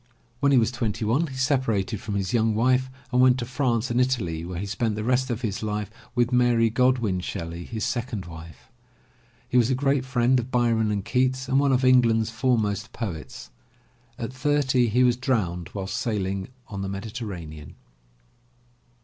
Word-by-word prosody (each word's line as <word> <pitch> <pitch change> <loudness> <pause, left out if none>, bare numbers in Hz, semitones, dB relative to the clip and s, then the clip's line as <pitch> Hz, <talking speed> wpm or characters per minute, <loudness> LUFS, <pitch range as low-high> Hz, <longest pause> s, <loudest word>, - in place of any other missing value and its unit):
When 140 +1 +3
he 135 - +5
was 115 0 +3
twenty 115 -2 -2
one, 135 +10 +2
he 135 - -8
separated 130 -7 0
from 105 -2 -4
his 100 +3 -2
young 110 -2 +2
wife 130 +3 +2 0.2
and 125 0 +3
went 130 0 +5
to 120 - -3
France 125 -2 0
and 120 +1 +2
Italy 100 -11 -1
where 90 0 -6
he 95 - -3
spent 105 +2 -1
the 105 - -3
rest 130 +3 +1
of 120 0 -2
his 110 -1 -2
life 105 -1 -3 0.2
with 120 0 +2
Mary 120 -2 +3
Godwin 120 -5 +2
Shelley, 85 -2 -5
his 110 -2 -3
second 120 -5 -3
wife. 80 -6 -12 0.8
He 125 - +1
was 120 0 +2
a 130 - +2
great 135 0 +1
friend 130 0 +2
of 120 +1 -5
Byron 115 -3 +2
and 100 -2 -2
Keats 130 +2 0
and 135 +1 +3
one 140 -1 +3
of 130 0 +2
England's 115 -3 +4
foremost 110 -3 0
poets. 80 - -6 0.7
At 115 +2 -5
thirty 130 -2 +2
he 125 +4 +3
was 125 -1 +3
drowned 100 - -1
while 100 -2 -4
sailing 95 -1 -2 0.2
on 100 -2 -6
the 95 - -3
Mediterranean. 95 - -7
115 Hz, 180 wpm, -25 LUFS, 100-130 Hz, 0.8 s, he